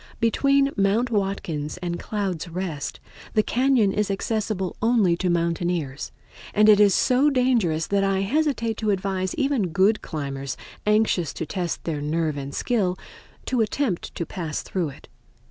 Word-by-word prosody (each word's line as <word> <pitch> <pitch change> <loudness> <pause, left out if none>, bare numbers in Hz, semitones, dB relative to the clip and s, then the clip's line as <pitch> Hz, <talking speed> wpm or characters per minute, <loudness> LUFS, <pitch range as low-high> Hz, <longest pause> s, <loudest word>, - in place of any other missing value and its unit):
Between 275 +4 +3
Mount 210 +5 +2
Watkins 190 -8 -2
and 175 -1 -4
Clouds' 190 -6 -3
Rest 170 -4 -4 0.4
the 215 - +4
cañon 245 -5 +2
is 210 -1 0
accessible 200 -1 -2
only 220 -6 +3
to 180 0 0
mountaineers, 170 -4 -1 0.4
and 210 +1 +5
it 210 -1 +7
is 205 -2 +6
so 260 +4 +4
dangerous 235 - +2
that 200 0 +1
I 195 -1 +1
hesitate 230 -1 0
to 215 - -1
advise 190 -1 -1
even 275 -9 +1
good 195 +5 +2
climbers, 140 -3 -4 0.3
anxious 210 -7 +2
to 160 - -4
test 175 -1 -3
their 155 -3 -3
nerve 155 0 -1
and 140 -1 -5
skill, 195 -7 0 0.5
to 250 -3 +1
attempt 220 -3 -1
to 170 - -3
pass 165 -5 -4
through 175 -5 -2
it. 135 - -14
195 Hz, 150 wpm, -24 LUFS, 170-225 Hz, 0.5 s, it